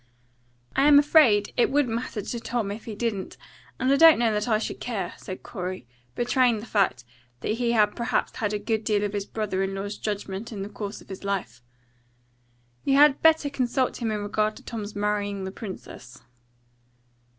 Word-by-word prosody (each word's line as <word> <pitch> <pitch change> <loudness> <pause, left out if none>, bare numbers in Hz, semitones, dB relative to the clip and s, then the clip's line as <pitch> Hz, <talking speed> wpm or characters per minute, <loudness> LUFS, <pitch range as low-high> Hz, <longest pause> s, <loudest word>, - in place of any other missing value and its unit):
"I'm 285 +2 +6
afraid 285 -8 +5
it 240 - +4
wouldn't 275 -5 +1
matter 230 -3 -3
to 235 - -4
Tom 230 -3 -2
if 215 +2 -7
he 220 - -6
didn't; 210 -3 -3 0.4
and 255 +1 +1
I - - +4
don't 325 +1 +8
know 230 -2 +2
that 210 +1 -1
I 220 -3 +3
should 220 - -4
care," 200 -8 -3
said 185 - -8
Corey, 185 - -5 0.3
betraying 245 -1 +2
the 210 - -8
fact 190 - +1 0.4
that - - -3
he 235 +1 0
had 210 -2 +3
perhaps 235 0 -1
had 210 -2 -1
a 210 - 0
good 220 +1 -2
deal 210 -2 +1
of 205 0 -2
his 200 -1 -3
brother 210 -3 -2
in 195 0 -2
law's 200 +1 -5
judgment 205 +1 -4
in 200 -3 -5
the 200 - -6
course 205 -1 -6
of - - -18
his 190 0 -8
life. 180 - -3 1.2
"You 275 - +2
had 290 0 +6
better 320 -2 +5
consult 260 -2 0
him 230 - 0
in 210 -1 -2
regard 215 +1 0
to - - -13
Tom's 215 -2 -6
marrying 205 -1 -1
the 190 - -4
princess." 185 - -10
215 Hz, 190 wpm, -26 LUFS, 200-240 Hz, 1.2 s, don't